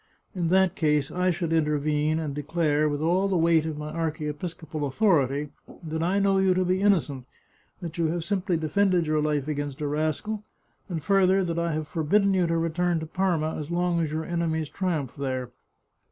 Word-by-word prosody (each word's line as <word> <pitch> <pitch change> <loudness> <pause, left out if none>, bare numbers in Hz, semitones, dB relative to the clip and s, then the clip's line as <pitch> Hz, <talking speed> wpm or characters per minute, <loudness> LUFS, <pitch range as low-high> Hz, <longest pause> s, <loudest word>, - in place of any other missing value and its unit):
In 175 -3 -1
that 190 +1 +3
case 150 -5 +1
I 180 +1 +1
should 170 -2 -1
intervene, 150 0 +1
and 155 -3 -3
declare, 150 +1 0
with 145 0 -2
all 180 +5 +2
the 190 -2 +1
weight 165 -1 +3
of 155 -2 -4
my 150 0 -5
archiepiscopal 155 0 -4
au 145 - 0
thority, 145 - +1 0.3
that 160 0 -3
I 180 +4 +1
know 195 -1 +3
you 190 -1 +3
to 185 0 +1
be 185 +1 +1
innocent; 160 -10 +1 0.6
that 170 0 -6
you 165 - +2
have 165 +1 -2
simply 185 -3 0
defended 180 +2 +2
your 155 0 +1
life 150 -2 0
against 145 -2 -3
a 150 - -2
rascal; 155 +8 -2 0.5
and 165 -4 -4
further, 190 +1 +3
that 170 -1 -2
I 170 -1 0
have 155 0 -3
forbidden 195 +6 +2
you 180 -2 +2
to 165 0 +1
return 165 +1 0
to 160 - -5
Parma 165 -2 0
as 150 0 -6
long 175 0 0
as 155 -2 -2
your 160 +1 -3
enemies 160 -3 -1
triumph 165 -9 -2
there. 130 -3 -3
165 Hz, 195 wpm, -26 LUFS, 150-180 Hz, 0.6 s, that